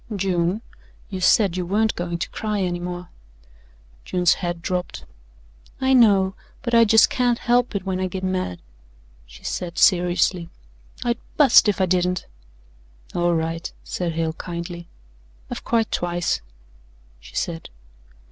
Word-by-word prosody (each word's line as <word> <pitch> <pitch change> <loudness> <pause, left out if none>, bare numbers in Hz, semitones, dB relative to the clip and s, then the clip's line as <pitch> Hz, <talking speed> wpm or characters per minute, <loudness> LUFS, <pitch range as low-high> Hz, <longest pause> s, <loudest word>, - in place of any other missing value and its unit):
"June, 185 +2 0 0.5
you 190 -1 -4
said 190 -1 +4
you 185 - -1
weren't 210 +5 +1
going 175 -1 -3
to 170 - -4
cry 215 -2 -2
any 175 -2 -1
more." 180 0 -6 0.9
June's 180 -2 +2
head 175 -1 -2
drooped. 180 -1 -3 0.7
"I 265 0 +2
know, 200 -6 +5 0.3
but 240 -2 -3
I 230 - +7
jes' 225 0 +6
can't 245 -2 +1
help 245 -1 +1
it 195 -1 -2
when 185 -1 -2
I 185 - 0
git 185 +1 -6
mad," 185 - -2 0.7
she - - -15
said 175 -1 -4
seriously. 175 -1 +3 0.5
"I'd 240 0 0 0.2
bust 270 -7 +7
if 205 - 0
I 190 - +4
didn't." 180 0 0 0.9
"All 175 0 +1
right," 165 +1 -2
said 175 -2 -3
Hale 160 0 -1
kindly. 170 0 -6 0.6
"I've - - -5
cried 225 -2 +1
twice," 175 -1 -1 0.8
she - - -15
said. 165 -1 -3
180 Hz, 140 wpm, -23 LUFS, 175-210 Hz, 0.9 s, I